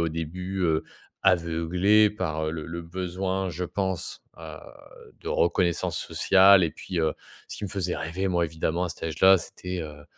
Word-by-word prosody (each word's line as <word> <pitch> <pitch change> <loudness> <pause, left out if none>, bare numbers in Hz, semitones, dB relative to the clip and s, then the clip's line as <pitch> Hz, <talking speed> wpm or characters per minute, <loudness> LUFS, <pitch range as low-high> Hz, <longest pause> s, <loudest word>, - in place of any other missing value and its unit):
au 85 - +1
début, 90 +4 -5
heu, 80 -2 +1 0.4
aveuglé 90 +4 +3
par, 80 -6 -3
heu, - - -1
le 80 -1 -6
le 85 +1 -6
besoin, 95 +2 -3
je 90 +2 -4
pense, 95 -1 -3 0.2
heu, - - -9 0.6
de - - -7
reconnaissance 85 0 +1
sociale 95 0 +5
et 80 - -1
puis, 90 +1 -4
heu, 80 -1 +1 0.3
ce - - -7
qui - - -5
me - - -4
faisait 95 -3 -2
rêver, 90 +4 -3
moi, 85 -2 +1
évidemment, 80 +2 -2
à - - -3
cet 85 - -9
âge 80 -1 -4
là, 95 0 +7
c'était, 90 +1 -6
heu, 75 -1 -10
90 Hz, 185 wpm, -26 LUFS, 80-95 Hz, 0.6 s, là